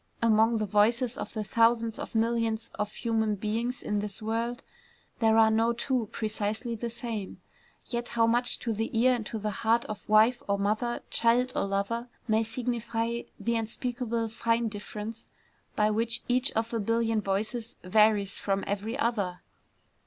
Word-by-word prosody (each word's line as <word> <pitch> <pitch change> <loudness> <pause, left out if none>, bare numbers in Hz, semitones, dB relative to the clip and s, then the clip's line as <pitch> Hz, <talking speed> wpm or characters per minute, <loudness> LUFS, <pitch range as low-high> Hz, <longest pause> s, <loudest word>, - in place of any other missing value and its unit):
Among 225 0 +4
the 215 - 0
voices 225 +4 +2
of - - -6
the 215 -2 -2
thousands 230 +1 +2
of - - -7
millions 225 0 0
of 210 0 -3
human 220 -3 0
beings 225 +5 -2
in 210 0 0
this 205 0 -5
world, 230 +3 -2 0.6
there 225 -1 +4
are 220 -1 +6
no 225 +2 +3
two 235 -2 -1
precisely 220 +2 -2
the 235 +1 -3
same; 230 -4 -5 0.5
yet 240 0 -3
how 230 -1 +3
much 240 +2 +2
to 230 - -1
the 225 +2 -2
ear 255 +2 +5
and 240 -3 -2
to 225 - -4
the 210 0 -2
heart 230 +1 +3
of 210 -1 -8
wife 220 +3 +5
or 200 0 +1
mother, 215 +4 -1
child 245 +2 +3
or - - +1
lover, 200 +5 -1 0.2
may 220 0 +3
signify 235 0 -2 0.2
the 235 0 0
unspeakably 235 0 -2
fine 230 +1 0
difference 210 +2 -7 0.5
by 210 0 +3
which 225 +2 +1
each 250 +2 +2
of 225 +1 -1
a 230 - 0
billion 225 +1 +1
voices 220 +4 -2
varies 205 +1 +3
from 195 -1 -1
every 210 +5 -3
other! 205 -9 -1
225 Hz, 165 wpm, -28 LUFS, 215-235 Hz, 0.6 s, are